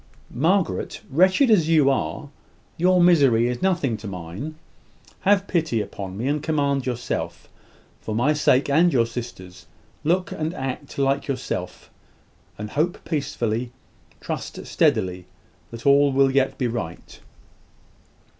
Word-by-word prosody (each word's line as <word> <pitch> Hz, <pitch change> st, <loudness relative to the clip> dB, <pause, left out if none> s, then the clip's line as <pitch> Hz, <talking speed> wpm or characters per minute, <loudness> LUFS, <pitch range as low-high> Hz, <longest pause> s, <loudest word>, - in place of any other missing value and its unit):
"Margaret, 170 Hz, +6 st, 0 dB
wretched 185 Hz, -, +4 dB
as 170 Hz, -7 st, +4 dB
you 150 Hz, -4 st, +5 dB
are, 140 Hz, +2 st, -3 dB, 0.5 s
your 180 Hz, +2 st, +3 dB
misery 140 Hz, -10 st, +5 dB
is 125 Hz, 0 st, -3 dB
nothing 170 Hz, -, +1 dB
to 105 Hz, +1 st, -9 dB
mine. 95 Hz, -, -6 dB, 0.6 s
Have 200 Hz, 0 st, +2 dB
pity 160 Hz, -, 0 dB
upon 95 Hz, -2 st, -6 dB
me, 120 Hz, +5 st, -2 dB
and 145 Hz, +1 st, 0 dB
command 140 Hz, -4 st, 0 dB
yourself. 125 Hz, -1 st, -4 dB, 0.5 s
For 110 Hz, -, -5 dB
my 130 Hz, +7 st, +2 dB
sake 140 Hz, -2 st, +3 dB
and 165 Hz, +5 st, +4 dB
your 120 Hz, -5 st, +3 dB
sister's, 115 Hz, -6 st, -8 dB, 0.4 s
look 180 Hz, +4 st, +1 dB
and 160 Hz, +3 st, -3 dB
act 135 Hz, 0 st, -5 dB
like 140 Hz, +1 st, +1 dB
yourself, 130 Hz, -3 st, -4 dB, 0.7 s
and 105 Hz, +1 st, -6 dB
hope 160 Hz, +5 st, -1 dB
peacefully, 120 Hz, -6 st, -2 dB, 0.5 s
trust -, -, -6 dB
steadily, 95 Hz, -, +1 dB, 0.4 s
that 115 Hz, +2 st, -10 dB
all 140 Hz, 0 st, +5 dB
will 135 Hz, 0 st, +3 dB
yet 135 Hz, 0 st, +1 dB
be 130 Hz, -, -1 dB
right." 110 Hz, -8 st, -5 dB
140 Hz, 130 wpm, -23 LUFS, 115-160 Hz, 0.7 s, you